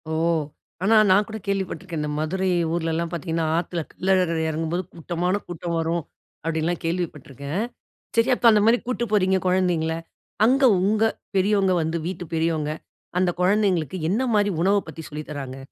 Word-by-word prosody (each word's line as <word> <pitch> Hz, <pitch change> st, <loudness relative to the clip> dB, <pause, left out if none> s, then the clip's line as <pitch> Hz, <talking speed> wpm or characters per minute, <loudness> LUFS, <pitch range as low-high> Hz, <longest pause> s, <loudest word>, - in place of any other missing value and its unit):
"ஓ! -, -, -2 dB, 0.7 s
ஆனா 220 Hz, +4 st, +4 dB
நான் 200 Hz, +3 st, +5 dB
கூட 220 Hz, -, -5 dB
கேள்விப்பட்டுருக்கேன். 185 Hz, -4 st, -2 dB
இந்த 150 Hz, -, -2 dB
மதுரை 185 Hz, +5 st, -1 dB, 0.3 s
ஊர்லலாம் 165 Hz, 0 st, -1 dB
பார்த்திங்கன்னா, 165 Hz, -1 st, -2 dB
ஆத்துல 170 Hz, 0 st, -2 dB
கள்ளழகர் 185 Hz, -3 st, +1 dB
எறங்கும்போது 165 Hz, +3 st, -2 dB
கூட்டமான 180 Hz, +4 st, -1 dB
கூட்டம் 170 Hz, 0 st, -4 dB
வரும்" 165 Hz, +1 st, -1 dB, 0.4 s
அப்டின்லாம் 165 Hz, +1 st, -1 dB
கேள்விப்பட்டுருக்கேன். 155 Hz, -, -3 dB, 0.5 s
சரி 230 Hz, +3 st, +4 dB
அப்ப 245 Hz, -, +3 dB
அந்த 210 Hz, -1 st, +4 dB
மாரி 230 Hz, +2 st, +5 dB
கூட்டு 250 Hz, -1 st, -1 dB
போறீங்க 190 Hz, -2 st, +3 dB
கொழந்தைங்கள, 175 Hz, -3 st, +1 dB, 0.5 s
அங்க 265 Hz, +4 st, +3 dB, 0.2 s
உங்க 210 Hz, +3 st, +2 dB, 0.3 s
பெரியவங்க 195 Hz, -1 st, +3 dB
வந்து 160 Hz, +1 st, -1 dB
வீட்டு 180 Hz, -1 st, -4 dB
பெரியவங்க, 160 Hz, -2 st, 0 dB, 0.5 s
அந்த 185 Hz, -1 st, +3 dB
கொழந்தைங்களுக்கு 185 Hz, -4 st, +2 dB
என்ன 210 Hz, +7 st, +1 dB
மாரி 205 Hz, -1 st, +3 dB
உணவ 195 Hz, +3 st, +4 dB
பத்தி 160 Hz, -, -8 dB
சொல்லித் 150 Hz, 0 st, -7 dB
தர்றாங்க? 135 Hz, -3 st, -6 dB
175 Hz, 145 wpm, -24 LUFS, 160-195 Hz, 0.7 s, நான்